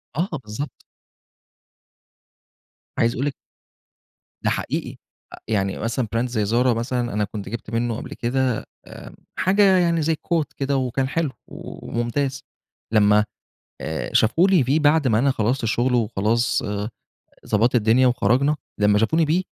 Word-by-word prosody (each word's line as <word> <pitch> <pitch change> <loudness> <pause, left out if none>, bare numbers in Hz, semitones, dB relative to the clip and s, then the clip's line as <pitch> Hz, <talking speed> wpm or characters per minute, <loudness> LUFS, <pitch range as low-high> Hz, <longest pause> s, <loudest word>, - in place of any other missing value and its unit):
آه 175 +6 0
بالضبط. 110 +8 -7 2.2
عايز 115 0 +2
أقول 135 - -2
لِك 145 - -1 1.1
ده - - +2
حقيقي، - - -3 0.5
يعني 100 -3 0
مثلًا 115 +1 -2
brand 120 +2 +1
زي 110 -4 -1
Zara 120 +4 +2
مثلًا، 120 -1 -2
أنا 105 0 0
كنت 105 0 -6
جبت 115 -1 -6
منّه 115 0 -1
قبل - - -7
كده 125 0 -1 0.2
آمم - - -11 0.2
حاجة 195 0 +4
يعني 170 -2 +2
زي 160 +1 +1
coat 165 0 0
كده، 140 0 0
وكان 130 +1 -1
حلو 155 -1 -1 0.2
وممتاز، 135 +4 -4 0.5
لمّا 105 0 +5 0.6
آآ 80 0 -3
شافوا 160 - +4
لي 185 -8 +4
فيه 140 +6 +2
بعد 150 -1 +3
ما 110 -1 +3
أنا 135 +1 +3
خلّصت 120 +2 0
الشغل 120 +3 +1
وخلاص 115 +1 +1 0.8
ضبّطت 115 +4 +2
الدنيا 120 +3 +4
وخرجنا، 125 +5 +2 0.2
لمّا 105 0 +4
شافوني 160 +8 +2
بيه 175 +5 +1
125 Hz, 140 wpm, -22 LUFS, 110-145 Hz, 2.2 s, لمّا